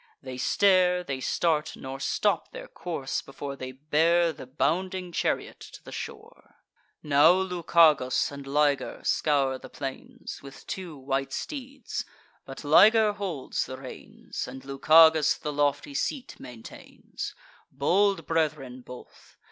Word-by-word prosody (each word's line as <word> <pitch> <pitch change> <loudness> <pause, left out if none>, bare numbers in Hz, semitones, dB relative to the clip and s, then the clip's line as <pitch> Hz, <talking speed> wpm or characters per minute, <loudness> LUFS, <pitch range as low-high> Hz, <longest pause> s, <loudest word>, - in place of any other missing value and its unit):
They 130 -1 -8
stare, 180 +2 +3
they 135 -6 -4
start, 150 +4 0
nor 135 0 -7
stop - - 0
their - - -8
course, 160 - -4
before 140 0 -7
They 130 -1 -7
bear 160 +5 +2
the 130 - -11
bounding 180 +6 -1
chariot - - -2
to - - -12
the - - -11
shore. - - -9 0.5
Now 150 +3 +6
Lucagus 170 -8 +3
and 140 -1 -9
Liger 145 0 +1
scour 135 -3 +1
the - - -11
plains, 135 -1 -7
With 140 0 -12
two 180 -5 -6
white 135 0 -2
steeds; 275 -2 -5 0.4
but - - -9
Liger 210 +8 +6
holds 190 -9 -3
the 130 - -7
reins, 130 -1 -8
And 130 0 -10
Lucagus 155 +3 +5
the 150 -1 -5
lofty 145 - 0
seat 275 -1 -3
maintains: 120 -3 -9 0.4
Bold 195 +9 +2
brethren 150 -6 -1
both. 125 0 -14
150 Hz, 130 wpm, -27 LUFS, 135-180 Hz, 0.5 s, Now